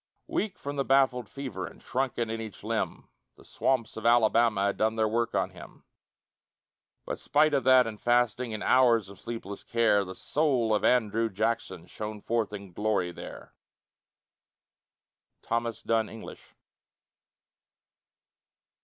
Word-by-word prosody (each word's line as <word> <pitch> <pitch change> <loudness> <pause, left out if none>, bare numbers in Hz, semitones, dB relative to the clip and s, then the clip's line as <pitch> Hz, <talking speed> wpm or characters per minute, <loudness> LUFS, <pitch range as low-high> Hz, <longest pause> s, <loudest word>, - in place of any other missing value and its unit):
Weak 210 -2 -2
from 145 0 -6
the 140 - +1
baffled 130 -4 +2
fever, 130 -9 -5
And - - -13
shrunken 125 -3 -2
in 115 0 -3
each 110 -2 -9
limb, - - -3 0.3
The - - -19
swamps 125 -4 -1
of 110 - -6
Alabama 115 -3 +4
Had 100 - 0
done 110 +1 +1
their 110 -1 +2
work 115 +2 -1
on - - 0
him; - - -13 1.2
But - - -4
spite 150 +1 +3
of 135 -2 +1
that 130 -1 +6
and 110 -2 -7
fasting, 120 0 +1
And 110 -1 -4
hours 120 -6 +4
of 100 - -13
sleepless 115 -4 -7
care, 115 -4 +2
The 95 -1 -8
soul 130 -7 +1
of 105 - +1
Andrew 115 -2 +2
Jackson 100 -4 -2
Shone 105 +3 -6
forth 115 0 -1
in 100 -2 -8
glory 105 -3 0
there. - - -10 1.9
THOMAS 115 0 -2
DUNN 115 -1 +1
ENGLISH. 110 - -11
115 Hz, 140 wpm, -28 LUFS, 105-125 Hz, 1.9 s, that